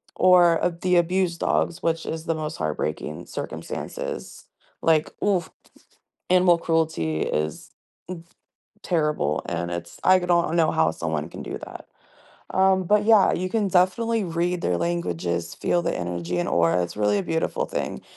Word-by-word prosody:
Or 175 -2 +5 0.2
the 180 -1 +2
abused 175 0 +1
dogs, 165 - 0
which 165 0 0
is 160 0 -5
the 165 - 0
most 155 -1 -4
heartbreaking 75 -1 -3
circumstances. - - -6 0.4
Like, 160 -1 +3
oof, 190 -5 +1 0.8
animal 180 -1 +5
cruelty 160 - 0
is 75 0 -3 1.1
terrible, 150 - 0
and 85 0 -3
it's 85 0 -6
I 185 0 +6
could 180 0 -5
not 170 -2 +2
know 165 -2 +3
how 80 0 +2
someone 80 -1 -3
can - - -9
do - - -5
that. - - -10 0.7
Um, 190 0 +3
but, 210 +3 +3
yeah, 220 -3 +6
you 185 +1 -1
can 210 0 0
definitely 200 +5 +2
read 175 +1 -1
their 90 - 0
languages, 85 - -2
feel 175 - 0
the 170 - -1
energy 90 0 -3
and 85 - -1
aura; 85 +1 +3
it's 85 - -6
really 105 -1 +2
a - - -1
beautiful 80 -2 -1
thing, - - -4
165 Hz, 150 wpm, -24 LUFS, -, 1.1 s, I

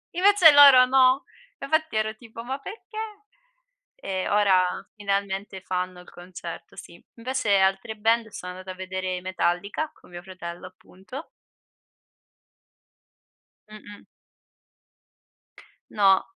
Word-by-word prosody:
Invece 365 -4 +6
loro 280 -3 +9
no. 260 +1 +4 0.4
Infatti 315 -2 -1
ero 215 0 -1
tipo: 230 0 -11
"Ma 265 +2 -4
perché!?" 430 - -11 1.0
E 190 -1 -3
ora 200 -3 +4 0.3
finalmente 200 -2 -3
fanno 185 -1 -4
il 180 - -16
concerto, 175 -1 -10
sì. 170 - -12
Invece 240 -3 0
altre 195 +3 0
band 225 +1 +1
sono 180 -3 -8
andata 185 +1 -8
a - - -12
vedere 185 0 -4
i - - -6
Metallica, 185 - -2
con - - -21
mio 175 0 -9
fratello 180 -2 -9
appunto. 190 - -12 2.4
Mh-mh. 210 -1 -13 1.9
No. 195 -2 +4
200 Hz, 110 wpm, -25 LUFS, 185-255 Hz, 2.4 s, loro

